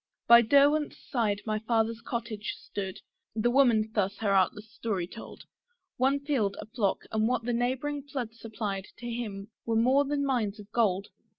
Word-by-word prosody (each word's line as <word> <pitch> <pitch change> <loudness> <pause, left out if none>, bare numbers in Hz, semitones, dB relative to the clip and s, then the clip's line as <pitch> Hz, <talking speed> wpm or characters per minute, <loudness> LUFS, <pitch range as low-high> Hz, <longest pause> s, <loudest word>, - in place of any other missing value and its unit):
By 235 0 +9
Derwent's 285 +5 +4
side 210 -5 -1
my 215 -1 -1
Father's 225 0 0
cottage 230 -3 -4
stood, 190 -2 -6 0.3
(The 235 +2 +2
Woman 235 -5 +4
thus 200 -1 0
her 210 -3 0
artless 195 +2 +2
story 200 -6 -2
told) 225 +6 -11 0.5
One 270 +2 +3
field, 255 -9 0
a - - -6
flock, 215 -3 -1
and 220 0 +2
what 250 -1 0
the 240 +1 -1
neighbouring 260 +5 -1
flood 240 -5 -3
Supplied, 210 -4 -5
to 240 - -7
him 220 -3 -5
were 230 - -1
more 255 +5 +4
than 285 0 -1
mines 225 -6 0
of 205 0 -12
gold. 200 -4 +1
225 Hz, 170 wpm, -29 LUFS, 210-245 Hz, 0.5 s, By